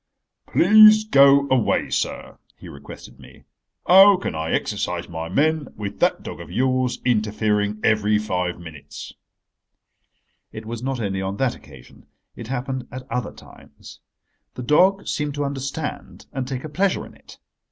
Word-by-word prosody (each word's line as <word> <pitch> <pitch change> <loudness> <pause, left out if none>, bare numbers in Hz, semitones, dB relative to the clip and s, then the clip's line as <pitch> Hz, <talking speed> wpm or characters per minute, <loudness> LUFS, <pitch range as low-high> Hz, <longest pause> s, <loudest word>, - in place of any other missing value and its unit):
"Please 215 +3 +6
go 140 -7 +5
away, 130 -3 +1
sir," - - -4 0.2
he - - -13
requested 70 0 -12
me. - - -16 0.4
"How 195 +2 +7
can 185 - -4
I 80 +1 -4
exercise - - -2
my 80 0 -6
men 155 - 0
with 100 -2 -7
that - - +1
dog - - -8
of - - -11
yours 130 +5 0
interfering 105 -2 0
every 105 -1 +2
five 90 -4 -3
minutes?" 75 -4 -11 1.4
It 110 0 -9
was 115 +1 -6
not 130 0 -3
only 95 -3 -3
on 95 +1 -4
that 135 -3 0
occasion. 60 -2 -17 0.3
It 115 - -9
happened 130 0 -4
at 130 0 -8
other 125 -3 -3
times. - - -16 0.6
The 125 - -6
dog 185 +9 +3
seemed 150 -1 -3
to 145 0 -2
understand 140 +2 -6
and 130 -3 -4
take 130 -1 -5
a 155 - -7
pleasure 190 +5 -1
in - - -15
it. - - -17
125 Hz, 150 wpm, -22 LUFS, 105-145 Hz, 1.4 s, How